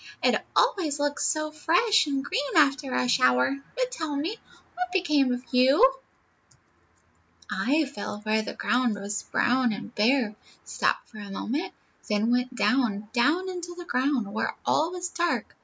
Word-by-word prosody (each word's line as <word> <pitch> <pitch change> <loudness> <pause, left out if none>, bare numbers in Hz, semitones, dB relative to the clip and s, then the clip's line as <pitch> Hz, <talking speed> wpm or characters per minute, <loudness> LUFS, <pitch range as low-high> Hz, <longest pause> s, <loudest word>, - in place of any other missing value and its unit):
"It - - +2
always 345 - +2
looks 290 0 0
so 310 0 -1
fresh 345 +7 +2
and 275 -1 -2
green 285 +2 -2
after 280 -2 +3
a 250 - +1
shower. 125 - +3 0.2
But, - - -1
tell 315 -11 -3
me, 320 +10 -2 0.4
what 360 0 -4
became 300 -8 +2
of 245 0 -3
you?" 275 - +5 1.6
"I 295 +6 +1
fell 210 -6 -6
where 215 0 +1
the - - -6
ground 245 -3 +1
was 205 +1 -4
brown 245 0 +1
and 230 +2 -7
bare, 230 0 +2 0.3
stopped - - -1
for 215 - -12
a 205 -1 -8
moment, 295 - -3 0.4
then 210 +2 +1
went 250 +1 0
down, 220 -6 +1
down 295 +10 +2
into 350 -1 -6
the 350 - -8
ground, 255 -8 0
where 220 - -2
all 315 +2 +2
was 360 0 -4
dark. 345 0 -2
275 Hz, 155 wpm, -26 LUFS, 235-335 Hz, 1.6 s, you